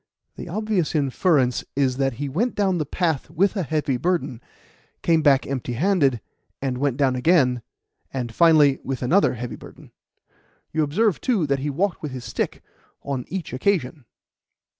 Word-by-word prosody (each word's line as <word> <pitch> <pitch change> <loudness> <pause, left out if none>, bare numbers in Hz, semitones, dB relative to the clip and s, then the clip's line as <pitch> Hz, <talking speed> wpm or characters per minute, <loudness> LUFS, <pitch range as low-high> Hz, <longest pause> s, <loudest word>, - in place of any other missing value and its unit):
The - - -8
obvious 205 -4 -1
inference 140 -2 +2
is 130 -2 +1
that 135 -1 +1
he 145 +5 -4
went 205 - -1
down 190 -4 +1
the 150 - -2
path 160 -4 -1
with 185 +6 +1
a 195 - 0
heavy 150 -4 -1
burden, 165 -5 -1 0.6
came 165 -2 +3
back 140 -3 +4
empty 130 -3 -3
handed, 140 - +2 0.4
and 130 -2 -2
went 140 -2 0
down 135 -3 +2
again 125 -3 +3 0.5
and 120 -3 -4
finally 155 -4 +5
with 130 -1 -4
another 170 +4 +3
heavy 120 +1 -6
burden. - - -14 0.8
You 160 - +1
observe, 180 +7 +1
too, 225 - +1
that 140 -1 0
he 145 +2 -2
walked 175 +6 -1
with 150 -4 -5
his 125 -2 -7
stick - - -3 0.4
on 135 -3 -3
each 175 -6 -5
occasion." 145 -3 -1
145 Hz, 160 wpm, -23 LUFS, 130-175 Hz, 0.8 s, finally